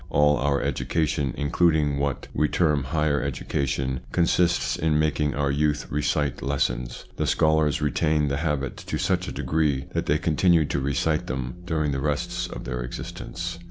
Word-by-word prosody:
All 75 0 +4
our 70 0 +1
education, 75 -4 0
including 75 0 +2
what 70 -1 -2
"we 75 - +2
term 75 -4 +1
higher 75 0 +1
education, 65 -1 -2
consists 85 0 +2
in 80 -1 +1
making 75 -1 +1
our 70 -1 +1
youth 75 +1 +1
recite 70 -2 0
lessons. 65 -3 -2
The - - 0
scholars 80 -2 +2
retain 75 +1 +1
the 70 0 -1
habit 75 -4 -2
to - - -4
such - - 0
a - - -4
degree 75 -4 0
that - - -1
they 75 - +3
continue 85 0 +3
to 70 - -1
recite 70 +3 0
them 65 +4 -4
during 75 -4 0
the 70 - -1
rest 75 0 -1
of - - -7
their 60 0 -4
existence. 85 +7 -6
75 Hz, 160 wpm, -25 LUFS, 70-80 Hz, -, All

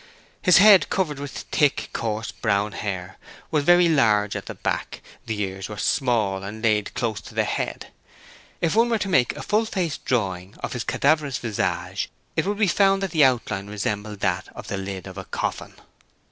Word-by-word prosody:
His 180 - +6
head, 200 -1 +7
covered 155 -7 -1
with 145 0 -5 0.2
thick, 145 -3 +1
coarse 110 -1 -3
brown 105 -1 0
hair, 95 -3 -5 0.3
was 150 -2 +2
very 175 +2 +6
large 110 -10 +3
at - - -5
the - - -6
back; - - -3 0.3
the 110 -2 -3
ears 95 0 -4
were 105 - -7
small 110 -5 +1
and 105 +3 -7
laid 105 -2 +2
close 110 -4 -2
to - - -13
the - - +2
head. - - -3 0.7
If 165 - +1
one 230 +2 +4
were 230 - +2
to 205 - -3
make 135 -10 +2
a - - -6
full 215 +2 +1
face 180 -8 -2
drawing 95 -6 -2
of - - -3
his 125 -2 -3
cadaverous 145 -3 +1
visage 110 -4 -2 0.3
it - - 0
would 205 0 -1
be 215 - +3
found 195 +1 +3
that 195 - -2
the 155 -3 +4
outline 115 -6 0
resembled 105 0 -4
that 95 +1 0
of 110 -4 -9
the 100 - -2
lid 95 -1 -5
of 95 0 -8
a 95 - -7
coffin. - - -4
115 Hz, 190 wpm, -24 LUFS, 100-160 Hz, 0.7 s, head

